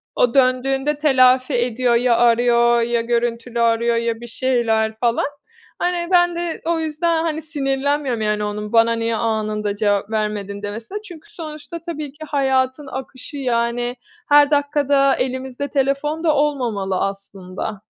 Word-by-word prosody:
o 240 Hz, -, +2 dB
döndüğünde 270 Hz, +2 st, +2 dB
telafi 260 Hz, -2 st, +4 dB
ediyor. 245 Hz, 0 st, +1 dB
Ya 235 Hz, 0 st, +3 dB
arıyor 235 Hz, 0 st, +4 dB
ya 235 Hz, 0 st, 0 dB
görüntülü 235 Hz, 0 st, -2 dB
arıyor 235 Hz, 0 st, +2 dB
ya 230 Hz, -1 st, -1 dB
bir 240 Hz, -, -8 dB
şeyler 225 Hz, -3 st, 0 dB
falan. 235 Hz, -1 st, +1 dB, 0.5 s
Hani, 355 Hz, -1 st, -1 dB
ben 350 Hz, -1 st, +4 dB
de 340 Hz, -1 st, -4 dB
o 335 Hz, 0 st, +1 dB
yüzden, 320 Hz, +1 st, 0 dB
hani, 315 Hz, -1 st, -2 dB
sinirlenmiyorum, 280 Hz, -4 st, -1 dB
yani, 210 Hz, 0 st, 0 dB
onun, 210 Hz, +1 st, -4 dB
"Bana 230 Hz, 0 st, +5 dB
niye 230 Hz, 0 st, -1 dB
anında 215 Hz, -2 st, -1 dB
cevap 205 Hz, -1 st, 0 dB
vermedin?" 205 Hz, -2 st, -3 dB
demesine. 225 Hz, -, -6 dB
Çünkü 350 Hz, -7 st, -13 dB
sonuçta 310 Hz, 0 st, -8 dB
tabii 305 Hz, -4 st, -6 dB
ki 310 Hz, +1 st, -9 dB
hayatın 265 Hz, 0 st, 0 dB
akışı 265 Hz, +3 st, -8 dB
yani 240 Hz, -1 st, -1 dB, 0.3 s
her 290 Hz, 0 st, +6 dB
dakika 285 Hz, -1 st, +1 dB
da 275 Hz, -1 st, +4 dB
elimizde 260 Hz, +2 st, -3 dB
telefon 285 Hz, +3 st, -1 dB
da 310 Hz, -3 st, +3 dB
olmamalı 235 Hz, -10 st, 0 dB
aslında. 195 Hz, 0 st, -5 dB
250 Hz, 145 wpm, -20 LUFS, 230-290 Hz, 0.5 s, her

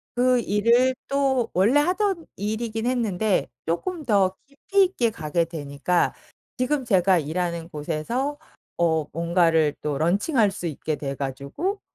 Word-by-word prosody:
그 250 Hz, 0 st, +3 dB
일을 235 Hz, +4 st, +3 dB
또 270 Hz, -4 st, +1 dB
원래 220 Hz, +11 st, +4 dB
하던 365 Hz, 0 st, 0 dB
일이긴 220 Hz, +2 st, -3 dB
했는데 220 Hz, -, 0 dB, 0.2 s
조금 310 Hz, -, -3 dB
더 195 Hz, -4 st, +2 dB
깊이 385 Hz, +8 st, +1 dB
있게 250 Hz, -11 st, 0 dB
가게 170 Hz, -4 st, -1 dB
되니까 160 Hz, +1 st, -1 dB, 0.4 s
지금 265 Hz, +1 st, 0 dB
제가 190 Hz, -4 st, +4 dB
일하는 170 Hz, +2 st, -3 dB
곳에서 175 Hz, -, -3 dB, 0.4 s
어 160 Hz, -3 st, +2 dB
뭔가를 165 Hz, -2 st, +2 dB
또 145 Hz, -2 st, -2 dB
론칭 195 Hz, -, 0 dB
할 210 Hz, -3 st, +5 dB
수 175 Hz, -2 st, -5 dB
있게 155 Hz, 0 st, -3 dB
돼 140 Hz, -2 st, -4 dB
가지고 140 Hz, -, -4 dB
200 Hz, 255 characters per minute, -24 LUFS, 165-255 Hz, 0.4 s, 할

